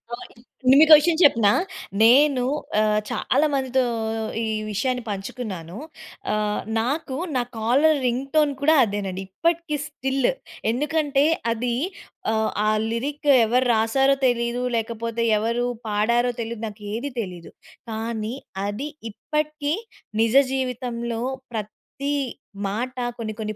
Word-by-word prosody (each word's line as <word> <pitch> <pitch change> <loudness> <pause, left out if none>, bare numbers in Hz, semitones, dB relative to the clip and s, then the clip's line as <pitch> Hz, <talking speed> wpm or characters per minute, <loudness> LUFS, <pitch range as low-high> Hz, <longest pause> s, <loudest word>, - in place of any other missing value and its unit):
ఓయ్! 245 - -12 0.5
మీకో 315 0 +8
విషయం 320 +1 +1
చెప్పనా? 230 -8 +5 0.5
నేను 255 +2 +6 0.4
ఆహ్, 215 0 +3
చాలా 285 +4 +1
మందితో 260 -1 +1 0.6
ఈ - - 0 0.2
విషయాన్ని 250 +4 -1
పంచుకున్నాను. 195 -3 -5 0.6
ఆహ్, 210 0 0 0.2
నాకు 265 +3 -2 0.2
నా 250 - +3 0.2
కాలర్ 275 +8 +3
రింగ్‌టోన్ 275 +4 +1
కూడా 315 +2 +5
అదేనండి 200 -3 -3
ఇప్పటికి 335 - -1
స్టిల్, 270 -3 0 0.4
ఎందుకంటే, 290 +1 +1 0.3
అది 235 +1 -1 0.6
ఆహ్, 220 0 +1
ఆ - - +2 0.2
లిరిక్ 285 +5 -2 0.2
ఎవరు 250 +3 +2
రాశారో 270 +5 +3
తెలీదు, 235 0 0
లేకపోతే 230 0 -2
ఎవరు 235 +3 0 0.2
పాడారో 235 +4 +2
తెలీదు. 230 -1 -5
నాకు 210 0 -10
ఏది 265 +5 -3
తెలీదు 180 -4 -8 0.4
కానీ, 220 0 -3 0.3
అది 250 +9 -4 0.2
ఇప్పటికీ 300 +3 -2 0.5
నిజ 230 +2 +2 0.2
జీవితంలో 240 -3 -3 0.3
ప్రతి 225 +6 -5 0.6
మాట 245 +6 -3 0.2
కొన్ని 215 -2 -3
కొన్ని 215 -1 -3
240 Hz, 110 wpm, -23 LUFS, 220-275 Hz, 0.6 s, మీకో